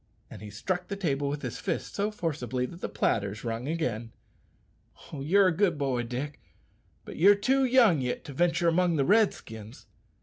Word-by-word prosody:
And - - -10
he 105 - -8
struck 175 - -3
the 200 - -4
table 145 -7 -1
with 145 0 -4
his - - -5
fist 175 -4 -3
so 205 +1 0
forcibly 135 - -3
that 170 +7 -10
the - - -3
platters 100 0 -1
rung 115 +2 -3
again. 120 -8 -2 1.0
"You're 180 +7 +3
a 170 - -2
good 180 -4 +2
boy, 135 -4 0
Dick; 125 +5 -5 0.6
but - - -9
you're 200 +5 +7
too 265 +6 +2
young 235 - +4
yit 125 -1 -3
to 145 - -8
ventur' 170 +3 +1
among 170 0 +2
the 140 -3 +1
Redskins." 120 - 0
155 Hz, 175 wpm, -28 LUFS, 125-185 Hz, 1.0 s, you're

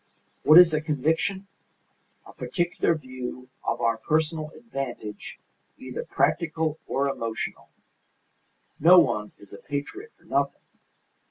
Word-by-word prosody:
What 155 +2 +7
is 175 -2 +9
a 155 - +1
conviction? 160 +6 -1 0.8
A - - -13
particular 175 -2 0
view 130 -3 -7
of 120 - -2
our 115 -1 +2
personal 155 +3 0
advantage 135 - -6 0.4
either - - -6
practical 160 -2 0
or 140 +1 0
emotional. 115 -4 -4 1.1
No 175 +4 +8
one 105 -11 +3
is 100 -1 -16
a 100 - -9
patriot 150 - -6
for - - -28
nothing. - - -1
155 Hz, 115 wpm, -26 LUFS, 125-170 Hz, 1.1 s, is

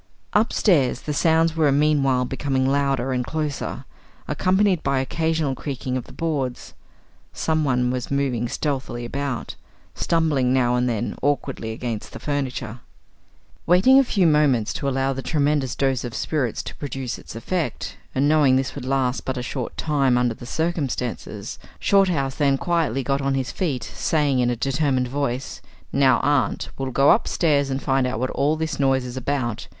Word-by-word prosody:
Upstairs, 185 - +2
the 150 - -3
sounds 165 +1 +3
were 155 -3 +3
meanwhile 140 -3 +2
becoming 135 0 -1
louder 135 -2 +1
and 125 -1 0
closer, 150 +1 -3 0.4
accompanied 190 -1 +2
by 140 0 0
occasional 160 +1 0
creaking 130 -2 -4
of 130 - -3
the - - -14
boards. 140 -7 -3 0.6
Someone 135 -6 +1
was 125 -1 -3
moving 130 -4 0
stealthily 130 -5 -3
about, 140 +1 -3 0.4
stumbling 150 -7 +1
now 125 -2 +2
and 125 0 +1
then 115 -1 -2
awkwardly 140 -5 -1
against 115 -1 -5
the - - -7
furniture. 130 -5 -3 0.9
Waiting 190 +11 +6
a - - +5
few 200 -7 +1
moments 145 -8 +3
to 140 - -2
allow 135 0 0
the 135 - -5
tremendous 145 -4 0
dose 135 -2 0
of 120 -2 -5
spirits 135 -8 -1
to - - -8
produce 135 -4 -4
its - - -11
effect, 165 +8 -3 0.2
and 135 +2 +2
knowing 150 -4 +4
this 130 0 0
would 140 -3 -7
last 130 -1 0
but 130 0 -3
a 125 - -3
short 125 -1 -5
time 140 -5 +2
under 125 -1 +1
the 120 +2 -11
circumstances, 145 -6 -3 0.2
Shorthouse 175 -9 +2
then 140 -2 +3
quietly 160 -6 0
got 140 +2 0
on 135 0 0
his 130 -2 -2
feet, 145 -9 -2
saying 145 -4 0
in 125 -1 +2
a 120 - 0
determined 135 0 0
voice 135 -1 -3 0.3
"Now, 135 -1 +4
Aunt 140 -6 +1
Julia, - - -7
we'll 135 -1 -2
go 140 +3 +5
upstairs 150 -10 +2
and 135 0 -3
find 135 -2 +2
out 125 -3 -3
what 130 +1 -1
all 145 +3 +1
this 160 -2 -3
noise 135 -2 +2
is 125 0 -6
about. 130 -3 -2
135 Hz, 165 wpm, -23 LUFS, 125-150 Hz, 0.9 s, Waiting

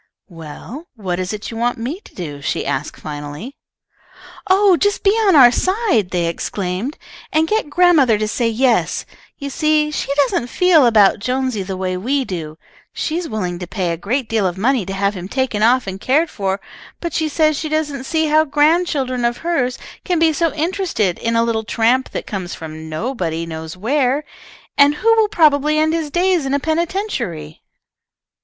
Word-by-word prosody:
"Well, 175 - -10
what 185 -5 -3
is 185 0 -2
it 210 +1 -6
you 225 - -6
want 240 +1 0
me 255 +10 -4
to - - -19
do?" 145 -6 -6
she - - -2
asked, 135 +3 -3
finally. 150 - -7 0.9
"Oh, 385 0 +5
just 410 +3 0
be 395 - +5
on 420 -4 +3
our 250 -4 +8
side!" 370 - +1
they 175 -2 0
exclaimed, 185 - -3 0.3
"and 315 +1 +2
get 430 -6 0
grandmother 295 -8 +4
to 215 0 -1
say 230 +2 0
yes. 235 +1 +1 0.3
You 280 -1 -6
see 305 +1 +1
she 300 - -3
doesn't 270 -4 +1
feel 320 0 +4
about 210 -3 +4
Jonesy 255 0 -1
the 190 0 -5
way 185 -1 -2
we 265 +8 -1
do. 160 -6 -6 0.3
She 315 - -3
is 350 - -5
willing 180 -5 -3
to 180 - -6
pay 180 -3 -2
a - - -1
great 235 - -2
deal 220 -4 +1
of 180 0 -4
money 235 -1 +1
to 195 - -4
have 200 +1 0
him 185 -2 -7
taken 255 -2 -1
off 245 +3 +4
and 190 0 -6
cared 310 +6 +2
for, 195 -1 -2 0.4
but 340 -3 -4
she 315 -1 0
says 310 0 +2
she 310 +2 -3
doesn't 295 -4 -2
see 320 +2 0
how 310 +1 +4
grandchildren 295 -4 +1
of 235 0 +1
hers 265 -7 0 0.3
can 355 -2 0
be 325 -1 +3
so 330 +1 +1
interested 320 - -1
in 230 0 -1
a 230 - +3
little 225 -1 -1
tramp 235 +4 +1
that - - -5
comes 185 -4 -5
from 160 0 -8
nobody 165 -3 -3
knows 160 +1 -7
where, 265 +6 +1 0.6
and 285 +1 +6
who 455 +8 +3
will 440 -2 +3
probably 300 -4 +3
end 315 +1 +2
his 325 -3 -2
days 350 -2 +1
in 270 - 0
a - - +1
penitentiary." 315 - -3
255 Hz, 190 wpm, -18 LUFS, 195-310 Hz, 0.9 s, our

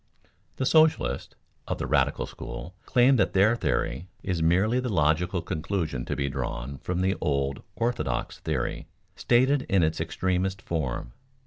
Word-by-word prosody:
_ - - -37
The 130 - -1
socialists 155 +3 +3 0.3
(of - - -2
the - - -3
radical - - +1
school) 90 - -8
claim 130 +2 +5
that - - +2
their 100 +5 +5
theory 90 -6 -1 0.2
is 90 -4 -1
merely 95 +9 +3
the 125 0 -2
logical 85 0 +1
conclusion 80 -5 -2
to - - -2
be 70 - -1
drawn 65 0 -4
from 90 +4 -2
the 95 +1 +2
old 70 -1 0
"orthodox" 120 +1 -2
theory, - - -2 0.3
stated 130 +4 +3
in 95 -3 +4
its 80 0 0
extremest 95 +3 -1
form. 70 -9 -3
90 Hz, 150 wpm, -27 LUFS, 75-110 Hz, 0.3 s, claim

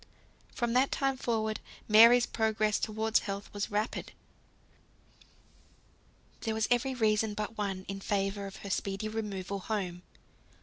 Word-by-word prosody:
From 240 -1 0
that 260 +2 +3
time 270 -1 +1
forward 220 -4 -1 0.3
Mary's 230 +3 +8
progress 220 -1 +1
towards 220 0 +1
health 200 0 -6
was 205 0 -2
rapid. 210 +2 -2 2.3
There 220 -1 -2
was 220 0 +1
every 255 +2 +2
reason, 215 -2 +1
but 215 +2 -4
one, 195 -3 -3
in 195 0 -5
favour 200 0 -1
of 195 - -9
her 200 - -4
speedy 195 +2 -2
removal 200 -3 -4
home. 185 -4 -3
215 Hz, 130 wpm, -31 LUFS, 200-225 Hz, 2.3 s, Mary's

